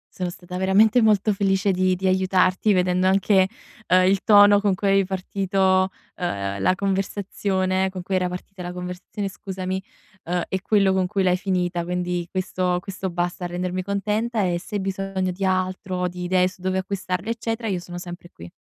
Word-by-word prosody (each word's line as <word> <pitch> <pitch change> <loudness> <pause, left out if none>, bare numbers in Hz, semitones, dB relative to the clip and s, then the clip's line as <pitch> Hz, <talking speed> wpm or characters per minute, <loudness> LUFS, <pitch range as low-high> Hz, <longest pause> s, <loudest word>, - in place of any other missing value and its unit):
Sono 180 -1 -2
stata 180 0 -8
veramente 205 +5 +4
molto 215 -1 +3
felice 195 0 +1
di 185 0 +2
di 190 +1 -1
aiutarti, 185 +2 +2
vedendo 180 0 +2
anche, 190 0 +4 0.4
uhm, 185 0 +5
il 190 0 +2
tono 205 -1 +7
con 200 -2 +2
cui 200 +2 -1
avevi 195 0 +4
partito, 190 0 +1 0.3
uhm, 100 - -3
la 185 - +3
conversazione, 190 -1 -1
con 185 -1 -6
cui 190 +1 -1
era 180 -1 +1
partita 180 +1 -8
la 175 0 -5
conversazione, 180 +3 -5
scusami, 190 0 -4 0.4
uhm, 175 +1 -1
e 190 - -2
quello 200 -3 +3
con 190 -1 +1
cui 195 0 -1
l'hai 180 -1 +3
finita. 180 -2 -1
Quindi 180 0 -2
questo 185 -1 -1
questo 190 0 -5
basta 175 +1 -2
a - - -1
rendermi 180 +1 -3
contenta, 210 +3 -1
e 175 -2 0
se 190 - -10
hai 200 - -1
bisogno 190 -1 -2
di 190 +2 -4
altro, 185 -1 -1
di 180 0 -6
idee 185 0 +3
su 185 0 -15
dove 185 0 -1
acquistarli, 190 +1 -3
eccetera, 225 0 -3
io 185 -3 -1
sono 175 0 -9
sempre 175 0 -8
qui. 85 +1 -11
185 Hz, 185 wpm, -23 LUFS, 180-195 Hz, 0.4 s, tono